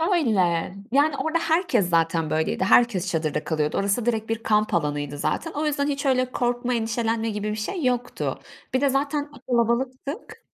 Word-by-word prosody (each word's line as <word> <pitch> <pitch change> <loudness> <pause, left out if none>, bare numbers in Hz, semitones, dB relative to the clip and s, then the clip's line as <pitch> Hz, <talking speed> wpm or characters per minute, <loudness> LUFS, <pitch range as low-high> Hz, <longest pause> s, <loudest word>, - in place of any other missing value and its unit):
Öyle, 185 - +1 0.2
yani 285 +1 +3
orada 320 +1 0
herkes 320 - +1
zaten 165 -1 +1
böyleydi. 160 +4 0
Herkes 195 -4 +3
çadırda 155 -2 -1
kalıyordu 155 -2 -1
orası 200 +4 0
direkt 225 -2 -1
bir 225 0 -2
kamp 215 -1 +2
alanıydı 145 -3 -1
zaten. 330 - -2
O 300 +1 -2
yüzden 285 -1 0
hiç 280 0 -2
öyle 255 -1 +2
korkma 245 0 -1
endişelenme 225 0 -1
gibi 210 0 -3
bir - - -2
şey 300 - -3
yoktu. 245 -1 -1 0.3
Bir 260 - +2
de 280 - +3
zaten 285 +2 -1 0.2
kalabalıktık. 255 - -1
235 Hz, 165 wpm, -24 LUFS, 190-275 Hz, 0.3 s, yani